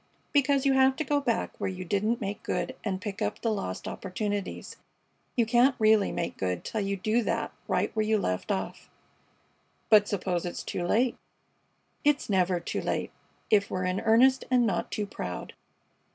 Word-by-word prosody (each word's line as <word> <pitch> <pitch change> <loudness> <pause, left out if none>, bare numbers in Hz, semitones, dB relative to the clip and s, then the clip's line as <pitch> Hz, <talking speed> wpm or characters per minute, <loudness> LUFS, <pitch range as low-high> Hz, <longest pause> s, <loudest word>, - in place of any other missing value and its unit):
"Because 280 -1 +3
you 275 - +4
have 265 0 +4
to 310 - -2
go 290 0 +1
back 235 -4 0
where - - -1
you 185 0 -6
didn't 210 +6 0
make 205 -2 -4
good 260 - -2
and 190 -3 -2
pick 200 -1 -6
up - - -1
the 230 - 0
lost 95 - -4
opportunities. 205 +1 -4 0.6
You 235 -3 +3
can't 245 +4 +4
really 215 -1 +4
make - - -3
good 90 -2 -2
till 220 - -2
you 200 0 -1
do 215 +5 +1
that - - -1 0.2
right - - 0
where 215 - +2
you 215 0 +2
left 90 - -2
off." - - -4 1.0
"But 210 -1 +7
suppose 185 -3 -1
it's 175 - -5
too 175 - -3
late?" 240 +5 +2 0.9
"It's 290 -6 +2
never 185 -2 +2
too - - -3
late - - -2 0.4
if 200 -2 +4
we're 185 0 -2
in 185 +1 0
earnest 245 +4 +4
and 250 -1 +4
not 185 -6 -1
too 210 - -2
proud." 90 - -6
215 Hz, 180 wpm, -28 LUFS, 190-245 Hz, 1.0 s, But